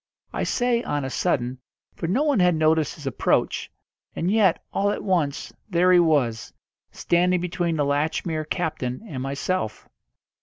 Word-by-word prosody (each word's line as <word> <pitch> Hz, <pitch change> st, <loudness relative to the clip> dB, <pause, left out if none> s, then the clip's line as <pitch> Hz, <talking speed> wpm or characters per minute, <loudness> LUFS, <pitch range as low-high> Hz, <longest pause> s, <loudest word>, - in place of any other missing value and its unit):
I -, -, -2 dB
say 245 Hz, -1 st, +1 dB
on 145 Hz, -, -2 dB
a 130 Hz, -, -4 dB
sudden, 125 Hz, 0 st, -1 dB, 0.3 s
for 165 Hz, -, -4 dB
no 230 Hz, -, +1 dB
one 290 Hz, -7 st, +2 dB
had 180 Hz, -1 st, +4 dB
noticed 155 Hz, -1 st, +2 dB
his 150 Hz, -, -12 dB
approach, 135 Hz, -, 0 dB, 0.5 s
and 175 Hz, +3 st, 0 dB
yet, 205 Hz, -5 st, +3 dB
all 200 Hz, +1 st, +1 dB
at -, -, -2 dB
once, 170 Hz, -8 st, -1 dB, 0.2 s
there 180 Hz, 0 st, +3 dB
he 180 Hz, -, +7 dB
was, 135 Hz, -9 st, +1 dB, 0.4 s
standing 180 Hz, +1 st, +2 dB
between 175 Hz, -1 st, -1 dB
the 145 Hz, -2 st, +1 dB
Latchmere 155 Hz, +2 st, -1 dB
captain 155 Hz, -, -2 dB
and 135 Hz, -8 st, -5 dB
myself. 140 Hz, -1 st, -3 dB
165 Hz, 155 wpm, -24 LUFS, 140-185 Hz, 0.5 s, he